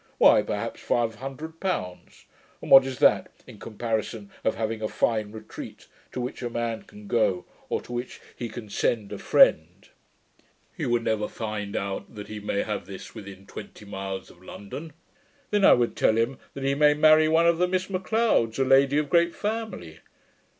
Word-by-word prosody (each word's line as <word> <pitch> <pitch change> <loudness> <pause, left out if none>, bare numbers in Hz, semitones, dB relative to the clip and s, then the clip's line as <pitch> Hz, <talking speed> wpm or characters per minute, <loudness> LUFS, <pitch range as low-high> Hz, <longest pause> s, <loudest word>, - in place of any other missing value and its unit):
Why, - - +7
perhaps, - - -4
five 115 -2 0
hundred 135 +7 -8
pounds; 90 - -4 0.3
and - - -9
what 135 0 +9
is 130 -1 -5
that, - - +4 0.2
in - - -13
comparison 110 -2 -4
of 110 - +1
having 110 0 -3
a 110 - 0
fine 110 -1 0
retreat, 110 0 -10 0.3
to - - -5
which 125 +1 -4
a 120 - -3
man 115 -1 -3
can 105 0 -14
go, 100 -5 +1 0.2
or - - -1
to 120 - -9
which 120 +1 -5 0.2
he 120 - -5
can 110 0 -8
send 105 0 -1
a - - -6
friend - - +3 0.4
" - - -37
He - - -3
would 120 -1 +1
never 110 -2 0
find 105 -2 -5
out 100 +3 -4
that 105 -1 -8
he 105 0 -6
may 100 -1 -1
have 105 -1 -4
this 95 -2 -9
within 100 -3 -10
twenty 105 - -10
miles 95 -1 -6
of 85 - -21
London. 140 - -9 0.6
Then 205 -1 +2
I - - +8
would 120 -1 +1
tell 110 - +3
him, 120 +4 0 0.2
that 135 - -5
he 135 0 +2
may 150 +1 +4
marry 155 +1 +6
one 165 +1 +4
of 170 0 +3
the 180 - +3
Miss 185 0 -1
M'Leods, 190 - +1
a 135 - +3
lady 135 +2 +4
of 150 -1 +1
great 170 +2 +3
family. 210 - -4
120 Hz, 190 wpm, -26 LUFS, 105-150 Hz, 0.6 s, what